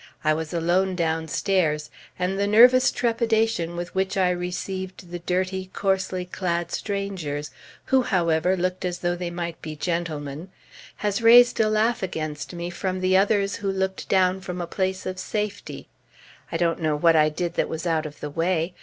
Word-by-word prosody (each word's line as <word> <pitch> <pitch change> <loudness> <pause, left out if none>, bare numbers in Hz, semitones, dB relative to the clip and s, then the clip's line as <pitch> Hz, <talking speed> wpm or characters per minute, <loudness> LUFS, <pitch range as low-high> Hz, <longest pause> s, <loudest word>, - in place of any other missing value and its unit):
I 155 - +3
was 160 0 -4
alone 180 +3 +1
downstairs, 160 -1 0 0.3
and 185 +2 -1
the 200 - +1
nervous 250 +5 +6
trepidation 225 -7 0
with 175 +1 -5
which 190 +1 -1
I 185 -1 +3
received 180 +1 -5
the 175 - -4
dirty, 185 +2 -2
coarsely 190 -2 -1
clad 175 -2 -2
strangers, 190 -8 -3 0.3
who, 265 -1 +3
however, 180 -4 +1
looked 185 +1 -2
as 180 -1 -2
though 175 0 -1
they 175 0 -4
might 170 -1 -5
be 155 -1 -6
gentlemen, 160 -1 -3 0.5
has 210 +1 -1
raised 240 +2 +7
a 215 -1 +3
laugh 220 +2 +1
against 155 -5 -4
me 175 0 -5
from 185 +1 -3
the 185 0 +2
others 200 0 +2
who 195 -1 -2
looked 190 0 -3
down 190 0 +3
from 180 -1 -5
a 175 - -2
place 190 +2 -2
of 185 0 -4
safety. 210 0 -4 0.6
I - - -1
don't 170 -1 0
know 155 -2 +1
what 165 +2 +4
I 155 -1 +5
did 170 +2 -3
that - - 0
was 160 +2 -4
out 160 -2 0
of 150 - -13
the 150 - -5
way. 165 +2 0
180 Hz, 175 wpm, -24 LUFS, 165-195 Hz, 0.6 s, raised